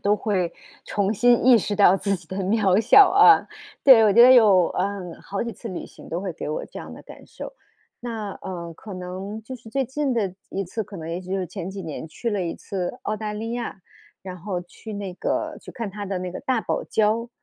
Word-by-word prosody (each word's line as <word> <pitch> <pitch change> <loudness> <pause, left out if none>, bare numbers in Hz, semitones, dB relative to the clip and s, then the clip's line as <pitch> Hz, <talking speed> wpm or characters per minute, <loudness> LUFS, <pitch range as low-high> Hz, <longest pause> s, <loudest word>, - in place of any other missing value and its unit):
都 205 +1 +2
会 190 -5 -1 0.3
重 205 0 0
新 240 +2 +3
意 255 -2 +8
识 210 0 -1
到 195 -2 +5
自 200 0 -1
己 175 -3 -8
的 190 - -5
渺 195 0 +2
小 360 - +7
啊。 410 +2 +6 0.4
对， 245 -5 +8
我 205 - +4
觉 235 - +7
得 250 - +9
有， 205 -8 +6
嗯， 190 -3 -3
好 195 0 -3
几 235 - -4
次 225 +3 -9
旅 185 - -6
行 - - -15
都 170 +2 -3
会 190 -3 -4
给 - - -6
我 155 - -3
这 - - -10
样 - - -9
的 - - -11
感 - - -14
受。 - - -9 0.5
那 220 -4 -5
呃， 170 -3 -6
可 205 +4 -10
能 185 +4 -6
就 260 +4 -8
是 225 -1 -15
最 270 +1 0
近 270 +2 -2
的 200 -6 -1 0.2
一 195 - -3
次， 220 +5 -4
可 200 0 -10
能 160 -1 -7
也 170 +2 -3
许 185 - -11
就 195 - 0
是 185 - -3
前 185 +1 -6
几 195 -1 -7
年 160 0 -6
去 235 +8 -4
了 205 -3 -1
一 170 - -3
次 185 -3 -5
澳 215 - -2
大 210 0 -4
利 225 +2 -4
亚， 240 -5 -5 0.4
然 185 -1 -7
后 180 0 -4
去 215 +5 -11
那 200 -2 -5
个 - - -2
去 - - -11
看 230 -4 -5
它 205 +1 -6
的 190 -1 -2
那 180 0 -4
个 180 - -7
大 255 -3 0
堡 - - -2
礁。 220 +2 +1
200 Hz, 260 characters per minute, -23 LUFS, 185-225 Hz, 0.5 s, 得